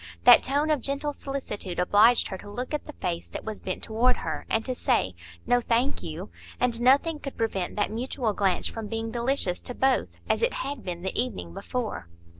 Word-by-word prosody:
That 245 - +9
tone 290 +4 +1
of 295 -4 +2
gentle 280 +2 -2
solicitude 260 -11 -5
obliged 210 +6 +5
her 190 - -4
to 205 - -10
look 250 +7 -5
at 300 - -2
the 300 - -7
face 175 -7 -3
that - - -7
was 215 -1 -5
bent 185 - -4
toward 240 +3 +2
her, - - -4
and 225 0 +1
to 255 - -1
say, 95 - +1 0.3
"No, 245 - +3
thank 240 +4 +1
you"; 170 +5 -6 0.3
and 240 -1 +1
nothing 285 +5 +4
could 275 - -7
prevent 195 -6 -1
that 205 - 0
mutual 235 0 -1
glance 195 -2 +1
from 225 -2 -3
being 225 +1 -3
delicious 235 -6 +1
to 250 - -6
both, 265 -1 +2 0.2
as - - +1
it 475 +2 +2
had 280 -4 -5
been 175 -1 -5
the 190 - -2
evening 90 - -2
before. 225 - -4
235 Hz, 205 wpm, -27 LUFS, 205-265 Hz, 0.3 s, That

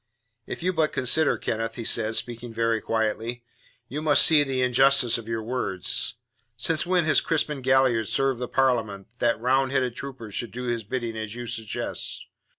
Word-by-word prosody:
"If - - -6
you 185 +1 +1
but 160 -2 +1
consider, 140 +5 +2
Kenneth," 115 0 -3
he 115 - -5
said, 110 -1 +1
speaking 120 0 -3
very 115 0 0
quietly, 115 +2 -2 0.4
"you 145 +4 -5
must 155 -2 +5
see 155 -2 +6
the 135 -3 0
injustice 125 -1 +4
of 115 - -11
your 115 -1 -3
words. 115 -6 -1 0.4
Since 160 +8 0
when 180 -2 +2
has 155 - +4
Crispin 150 -3 -1
Galliard 130 -4 +3
served 135 +1 0
the 125 - -2
Parliament, 115 -8 0
that 115 -2 +1
Roundhead 130 0 +1
troopers 120 -6 -8
should 120 - -3
do 125 +4 -6
his 120 -2 -2
bidding 115 +1 -4
as 110 0 -5
you 120 0 -6
suggest? 115 -3 -4
120 Hz, 170 wpm, -25 LUFS, 115-135 Hz, 0.4 s, see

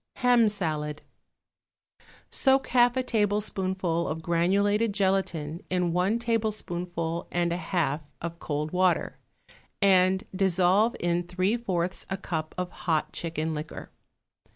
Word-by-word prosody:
=Ham 245 -3 +4
Salad.= 155 -6 -2 1.3
Soak 270 0 +3
half 245 0 +4
a 260 - +1
tablespoonful 190 -6 0
of 160 +1 -4
granulated 200 +6 +2
gelatine 190 -5 0
in 180 -2 0
one 185 +6 +2
tablespoonful 180 -8 -2
and 175 -1 +1
a - - -2
half 165 -4 -1 0.2
of 170 0 -6
cold 150 +1 -3
water, 185 -1 +1 0.6
and 190 -1 +4
dissolve 190 +3 +3
in 175 0 +1
three 185 +4 0
fourths 185 -6 -2
a 195 - -2
cup 160 -4 -4
of 180 -1 -3
hot 160 -3 -1
chicken 160 -1 -3
liquor. 155 +1 -7
180 Hz, 120 wpm, -27 LUFS, 170-205 Hz, 1.3 s, =Ham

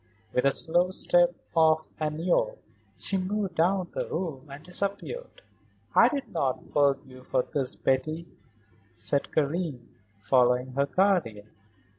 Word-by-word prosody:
With 125 - +1
the 140 - +5
slow 175 +4 +2
step 175 -1 +3 0.2
of 160 -1 +4
a 155 -1 0
Niobe 180 - 0 0.4
she 195 - 0
moved 190 0 -2
down 180 +2 +1
the - - -3
room 155 -5 -4
and 140 +2 -10
disappeared. 200 - -4 0.5
"I - - +7
do 285 -2 -2
not 140 -6 -2
forgive 140 -1 +2
you 130 -1 -13
for 130 -1 0
this, 135 -3 -1
Betty," 155 +6 0 0.7
said 140 - -1
Karen, 150 -4 -1 0.3
following 125 +4 +2
her 140 +2 0
guardian. 140 - +1
155 Hz, 135 wpm, -27 LUFS, 135-180 Hz, 0.7 s, I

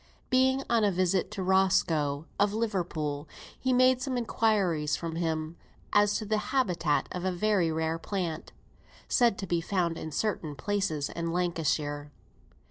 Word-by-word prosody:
Sir - - -30
J. - - -30
E. - - -29
Smith, - - -34
being 260 +1 +3
on 230 -2 +2
a 205 - +3
visit 185 0 +1
to 190 - -4
Roscoe, 165 -6 +2
of 205 +1 +2
Liverpool, 165 -9 -2 0.3
made 255 0 +4
some 255 -1 -2
inquiries 200 -10 +1
from 165 -1 -5
him 160 -1 -2 0.4
as 205 0 +4
to 215 - -5
the 215 0 +1
habitat 180 - +1
of 180 - -4
a 185 - +1
very 185 -2 +1
rare 160 +1 -1
plant, 175 -4 -4 0.6
said 235 -6 +3
to 195 - -4
be 170 -2 0
found 170 -2 -1
in 160 - -6
certain 160 -3 -2
places 175 -2 -1
in 170 0 -3
Lancashire. 155 -4 -1
180 Hz, 165 wpm, -29 LUFS, 160-210 Hz, 0.6 s, made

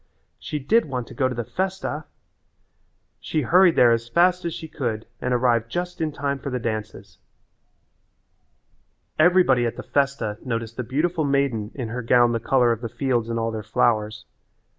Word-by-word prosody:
She 150 - -4
did 210 - +2
want 125 -5 -4
to - - -10
go 130 -2 +1
to 125 - -5
the 120 - -2
festa! 185 - -3 1.1
She 155 - -2
hurried 180 +4 +5
there 120 -1 +6
as 115 0 0
fast 180 +5 +3
as 170 - -1
she 160 - -7
could 120 -8 -3 0.2
and 125 - -1
arrived 120 -2 +2
just 175 +4 -4
in 155 -1 0
time 140 -1 -3
for 140 - -5
the 125 - -2
dances. 110 -3 -5 2.0
Everybody 155 -8 +4
at 115 - -4
the - - -7
festa 140 -7 -1
noticed 115 -2 -4
the 125 - -2
beautiful 155 +7 -1
maiden 140 -7 0
in 125 -5 -4
her 125 +2 -4
gown 120 0 +4
the 115 - 0
colour 120 +1 +3
of 115 -1 -2
the 115 - -4
fields 120 -1 -1
and 115 - -2
all 115 0 -1
their 110 -1 -4
flowers. 110 0 0
125 Hz, 180 wpm, -23 LUFS, 115-150 Hz, 2.0 s, there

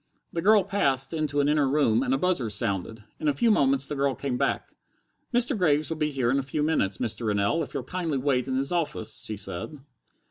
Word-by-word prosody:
The 165 - -1
girl 210 +2 +5
passed 140 -9 0
into 150 -2 0
an 140 - +1
inner 145 -2 +2
room, 130 -5 +2
and 130 -1 -1
a 135 - +3
buzzer 155 -8 0
sounded. 100 +1 -1 0.2
In 155 - -2
a 145 - +3
few 225 +11 +2
moments 140 -7 +2
the 150 - -5
girl 140 -1 0
came 135 -3 -3
back. - - -1 0.6
"Mr. 245 +2 +2
Graves 155 -5 +1
will 160 - -2
be 150 -1 0
here 130 -4 0
in 135 - +2
a - - 0
few 135 +3 -2
minutes, 100 - +1
Mr. 110 +2 -2
Rennell, 105 +9 +1
if - - -6
you'll 135 - -2
kindly 165 0 -2
wait 130 -2 0
in 130 -1 -1
his 135 +3 0
office," 150 -10 -2
she 110 - -4
said. 100 - -6
140 Hz, 225 wpm, -26 LUFS, 125-155 Hz, 0.6 s, girl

